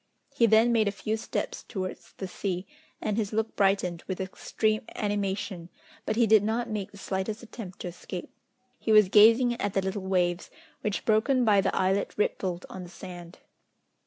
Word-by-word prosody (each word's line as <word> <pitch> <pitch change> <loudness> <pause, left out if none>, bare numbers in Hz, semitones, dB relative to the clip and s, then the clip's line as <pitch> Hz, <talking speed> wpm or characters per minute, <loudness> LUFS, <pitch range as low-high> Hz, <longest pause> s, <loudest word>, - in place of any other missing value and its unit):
He 230 - +4
then 220 +2 +5
made 220 -3 +3
a - - +2
few 215 +2 -2
steps 220 - -3
towards 185 -3 -6
the 190 - -6
sea, 185 0 -3 0.4
and 210 -1 -1
his 210 -3 -1
look 220 +1 -1
brightened 195 -4 +1
with 190 -1 -3
extreme 215 +3 -1
animation, 195 -4 -2 0.4
but 215 - 0
he 235 +1 +4
did 220 -1 +6
not 225 +3 -1
make 205 -3 -3
the 200 - -13
slightest 195 +3 -3
attempt 215 -5 -9
to 180 - -4
escape. 175 +1 -8 0.5
He 220 - -1
was 215 -3 +7
gazing 230 +4 +6
at 205 - -1
the 195 - +3
little 190 +1 -2
waves, 180 -1 0 0.3
which 210 -2 -2
broken 240 +4 +3
by 205 -3 +5
the - - 0
islet 190 +2 +1
rippled 185 -3 -1
on 190 - -8
the 175 - -9
sand. 175 -1 -10
200 Hz, 180 wpm, -28 LUFS, 190-220 Hz, 0.5 s, was